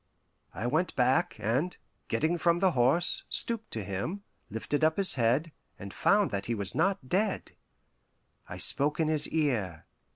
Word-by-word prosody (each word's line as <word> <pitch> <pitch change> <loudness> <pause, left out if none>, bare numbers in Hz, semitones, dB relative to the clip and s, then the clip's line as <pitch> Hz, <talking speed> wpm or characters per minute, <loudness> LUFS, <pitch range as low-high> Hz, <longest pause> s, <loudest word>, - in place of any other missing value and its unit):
I 115 - -4
went 160 +7 -1
back, 130 +1 +1
and, 130 - -2 0.3
getting 160 +9 -1
from 170 +1 +2
the 190 +1 +2
horse, 135 +6 +2
stooped 230 -2 +1
to 110 - -4
him, 100 - -5 0.3
lifted 130 +8 -3
up 160 0 +2
his 195 -1 +6
head, 130 +7 0 0.3
and 100 0 -9
found 205 -1 +2
that 100 -1 -4
he 120 - -1
was 100 -4 -3
not 190 -8 0
dead. 200 +6 -1 1.0
I - - -7
spoke 150 +3 +2
in 160 -1 +1
his 155 -1 +2
ear. 110 - -2
150 Hz, 160 wpm, -29 LUFS, 115-175 Hz, 1.0 s, his